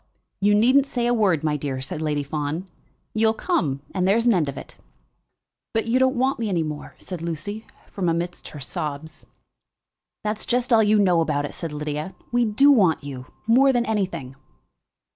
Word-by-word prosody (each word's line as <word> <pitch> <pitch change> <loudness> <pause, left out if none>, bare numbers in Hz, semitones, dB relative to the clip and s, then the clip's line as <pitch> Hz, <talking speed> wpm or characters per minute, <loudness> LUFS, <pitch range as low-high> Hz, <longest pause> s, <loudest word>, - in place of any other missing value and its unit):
"You 205 +1 +4
needn't 260 +6 +4
say 245 -3 -1
a 240 - +2
word, 195 -10 +2
my 155 -1 +1
dear," 135 -2 -3
said 155 +5 -5
Lady 150 -2 -1
Fawn. 150 +4 -3 0.5
"You'll 220 0 +2
come, 150 - -1
and 185 -1 +1
there's 225 +4 +3
an 240 - +5
end 160 -7 +1
of 140 - -7
it." - - -9 1.0
"But 225 - +1
you 235 +3 +2
don't 260 +1 +3
want 260 +1 +1
me 225 -2 -1
any 170 -4 +1
more," 150 -1 -6
said 180 -3 -7
Lucy, 170 +7 -5 0.2
from 185 -4 -1
amidst 170 +1 -3
her 150 - -9
sobs. 145 +3 -6 1.0
"That's 210 0 -3
just 245 +1 +1
all 225 - +7
that 215 - +3
you 215 +1 +4
know 180 -5 +4
about 145 -3 0
it," - - -7
said 165 -3 -5
Lydia. 150 +4 -4 0.2
"We 240 0 +3
do 250 +7 +5
want 185 - +3
you, 130 -3 -7 0.2
more 260 +5 +5
than 240 -2 +1
anything." 180 -11 -2
185 Hz, 190 wpm, -23 LUFS, 150-230 Hz, 1.0 s, all